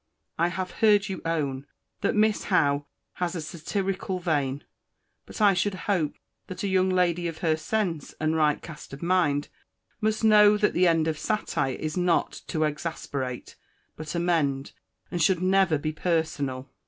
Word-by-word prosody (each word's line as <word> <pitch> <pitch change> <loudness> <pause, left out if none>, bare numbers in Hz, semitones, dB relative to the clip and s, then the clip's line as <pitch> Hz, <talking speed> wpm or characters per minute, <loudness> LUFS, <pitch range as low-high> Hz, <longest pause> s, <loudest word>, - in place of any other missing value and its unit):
I 170 - +4
have 185 +1 -4
heard 210 -3 +3
you 190 - -4
own, 145 -4 -2 0.3
that 205 - +1
Miss 215 0 +2
Howe 145 -6 +2 0.3
has 180 0 0
a - - -2
satirical 185 +4 -3
vein; 145 -6 -1 0.6
but - - -9
I 205 -2 +6
should 190 +2 0
hope 175 -8 0 0.3
that 185 - -6
a - - 0
young 190 -1 +2
lady 175 -2 +1
of 165 -1 -5
her 160 -1 +3
sense, 165 -1 -2
and 155 +1 +1
right 150 -2 +2
cast 155 -4 -10
of 140 - -8
mind, 170 -5 +1 0.5
must 215 0 0
know 210 -1 +6
that 210 0 +2
the 180 0 +4
end 165 -1 +3
of 155 -1 -2
satire 210 - -1
is 155 +3 -4
not 175 -1 +2 0.2
to 155 - 0
exasperate, 145 -4 -4 0.4
but 155 +2 -6
amend; 155 -6 0 0.4
and 175 -1 -2
should 180 +2 +3
never 190 -4 +3
be 155 +2 -2
personal. 150 -6 -1
170 Hz, 165 wpm, -26 LUFS, 150-190 Hz, 0.6 s, I